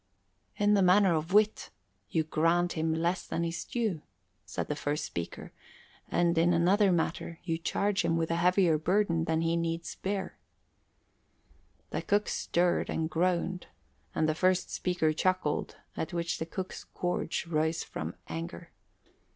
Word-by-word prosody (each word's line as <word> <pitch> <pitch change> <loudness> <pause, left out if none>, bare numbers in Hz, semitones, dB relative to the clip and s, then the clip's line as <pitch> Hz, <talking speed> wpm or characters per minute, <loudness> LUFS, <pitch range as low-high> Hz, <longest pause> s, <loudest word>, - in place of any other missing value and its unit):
"In 205 0 +3
the 200 - +4
matter 185 0 +5
of 160 +2 -2
wit, 210 +1 +3 0.4
you 160 - +1
grant 165 +3 +2
him 160 0 0
less 170 +3 0
than 170 - -1
his 165 0 -3
due," 220 -10 -2 0.5
said - - -3
the - - -2
first 145 +1 -2
speaker. 85 -1 -6 0.6
"And 170 0 +2
in 170 +1 +4
another 190 +4 +4
matter 165 0 -1
you 165 -2 -2
charge 200 +3 0
him 165 0 +1
with 165 0 0
a 165 - +1
heavier 180 -2 +3
burden 170 -1 +1
than 160 0 +1
he 165 0 +1
needs 165 0 -2
bear." 195 0 -4 1.5
The - - -2
cook 205 +1 +1
stirred 175 0 +1
and 160 0 -1
groaned 180 +2 0 0.5
and 155 - +2
the 155 - +2
first 185 +3 +1
speaker 175 -4 0
chuckled, 185 -2 0 0.2
at 160 - -4
which 170 0 -1
the 160 - -3
cook's 185 +2 -5
gorge 180 -1 -1
rose 160 0 0
from - - -5
anger. 85 +1 -6
170 Hz, 150 wpm, -30 LUFS, 160-185 Hz, 1.5 s, matter